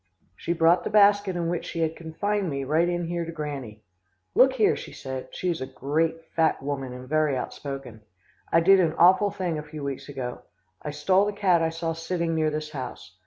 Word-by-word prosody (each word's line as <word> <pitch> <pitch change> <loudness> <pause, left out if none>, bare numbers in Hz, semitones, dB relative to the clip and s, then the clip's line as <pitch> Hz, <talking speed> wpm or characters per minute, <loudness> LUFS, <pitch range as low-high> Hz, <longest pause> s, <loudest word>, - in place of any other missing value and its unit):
"She 170 - -4
brought 170 +1 +4
the - - -2
basket 205 -2 +4
in 170 -1 -1
which 170 0 -2
she 165 - -4
had 160 0 0
confined 195 +4 -2
me 140 -2 -3
right 160 +5 +2
in 175 -1 -1
here 170 0 -2
to 165 - -6
Granny. 140 -9 -6 0.5
'Look 265 0 +5
here,' 225 -5 +3
she - - -8
said 130 -1 -6
(she 185 - -4
is 165 - -4
a 130 - -3
great, 160 +5 -1
fat 160 -4 +2
woman 135 -2 -3
and 125 0 -9
very 155 -1 +1
outspoken), 135 -4 -6 0.5
'I 165 - +5
did 195 +3 +6
an 165 -4 +2
awful 185 +5 +5
thing 175 -5 -3
a - - -4
few 150 -1 -9
weeks 140 0 -5
ago. 130 -3 -5 0.4
I - - -5
stole 185 +7 +2
the 205 - -2
cat 190 -4 +3
I 165 - +2
saw 165 0 -3
sitting 165 0 -2
near 155 -1 +1
this 155 0 -4
house. 125 - -7
165 Hz, 215 wpm, -26 LUFS, 140-175 Hz, 0.5 s, did